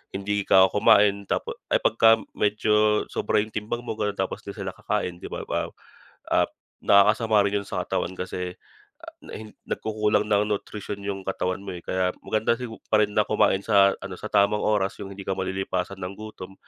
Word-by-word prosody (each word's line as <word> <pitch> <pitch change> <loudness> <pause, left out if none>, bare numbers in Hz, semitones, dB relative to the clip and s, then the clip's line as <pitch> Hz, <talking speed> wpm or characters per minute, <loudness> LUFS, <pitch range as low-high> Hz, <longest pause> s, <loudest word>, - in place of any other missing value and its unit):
hindi 100 +1 -2
ka 95 0 +6
kumain 100 -1 +4
tap - - 0 0.3
ay - - +3
pagka 115 0 +5 0.2
medyo 105 0 +2
sobra - - +1
yung 110 - -9
timbang 110 +3 -3
mo, 110 - -4
ganun, 105 -1 0
tapos - - -3
'di - - -6
sila - - -4
kakain, 85 -1 -2
di - - -10
ba? - - -5
Ah, - - 0 0.7
ah, - - +3 0.4
nakakasama 105 +2 +5
rin 100 +1 +1
yun - - -17
sa - - -2
katawan 95 - -2
kasi, 90 0 -4 0.5
ah, 335 - -9
na - - -11
hin 110 0 -8 0.2
nagkukulang 105 -1 0
ng 105 0 +3
nutrition 105 0 -6
yung 100 -1 -3
katawan 90 -1 -2
mo, 95 -2 -6
eh, 85 - -8
kaya 95 -1 0
maganda 110 +1 +1
sigu 115 -3 -6
pa 110 -1 +5
rin 105 - -2
na 105 - +5
kumain 100 -2 +2
sa 100 -2 +5
ano, 100 -1 -6
sa 110 - -6
tamang 100 +1 +3
oras, 100 -2 +1
yung 95 - -6
hindi 100 0 -9
ka 95 - +1
malilipasan 95 0 -3
ng 90 +1 -5
gutom. 105 -3 -9
100 Hz, 195 wpm, -25 LUFS, 95-105 Hz, 0.7 s, ka